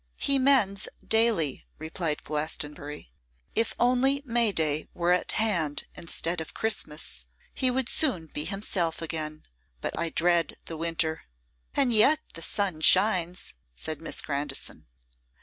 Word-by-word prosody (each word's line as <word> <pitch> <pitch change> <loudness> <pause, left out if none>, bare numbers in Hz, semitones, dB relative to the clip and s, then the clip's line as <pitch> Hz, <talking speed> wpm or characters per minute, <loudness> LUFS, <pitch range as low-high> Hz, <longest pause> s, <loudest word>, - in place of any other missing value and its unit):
'He 275 -1 +3
mends 235 -8 +3 0.2
daily,' 220 - +2
replied 160 0 -3
Glastonbury. 150 - -4 0.4
'If 225 0 0
only 260 +3 +3
May 235 -3 +3
day 155 -4 0
were 175 0 +1
at 180 - +1
hand 175 -10 0
instead 170 0 0
of 160 - -9
Christmas, 150 - -2 0.3
he 260 - +1
would 255 -1 0
soon 225 - 0
be 150 -1 -3
himself 185 -3 -1
again; 155 -2 -3 0.4
but - - -3
I 170 0 +1
dread 170 -2 +2
the 165 - -7
winter.' 160 0 -1 0.5
'And 265 -4 +3
yet 250 +8 +7 0.2
the 165 - -8
sun 185 -2 -1
shines.' 185 - +3 0.2
said 155 - -3
Miss 165 - +2
Grandison. 145 - -3
170 Hz, 130 wpm, -27 LUFS, 155-220 Hz, 0.5 s, yet